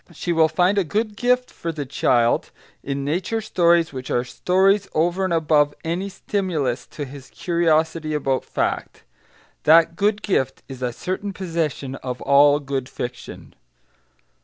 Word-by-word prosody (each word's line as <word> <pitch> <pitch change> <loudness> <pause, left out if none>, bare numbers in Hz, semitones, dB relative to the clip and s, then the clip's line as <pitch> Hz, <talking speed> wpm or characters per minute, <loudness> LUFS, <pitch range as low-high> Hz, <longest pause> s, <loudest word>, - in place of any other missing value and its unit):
She 170 +1 -3
will 160 -1 +4
find 180 +5 +2
a - - +2
good 210 +6 -2
gift 250 +2 +1
for 165 - -5
the 150 -3 -5
child 120 -3 +1 0.3
in 140 0 -3
nature 180 +9 -1
stories 170 -6 +2
which 130 -1 -6
are 120 - +1
stories, 190 +10 +2
over 175 +4 +1
and 185 - -1
above 150 -3 +2
any 175 +4 -2
stimulus 170 -10 -2
to 145 - -6
his 135 0 -11
curiosity 160 -2 0
about 135 -3 0
fact. - - -3 0.6
That 165 +1 +5
good 205 +2 0
gift 135 -9 -1
is 130 -2 -9
a 125 -1 -1
certain 190 +9 -4
possession 165 -7 -3
of 125 -1 -5
all 145 +1 +5
good 135 -2 -4
fiction. 125 0 -7
160 Hz, 150 wpm, -22 LUFS, 140-185 Hz, 0.6 s, That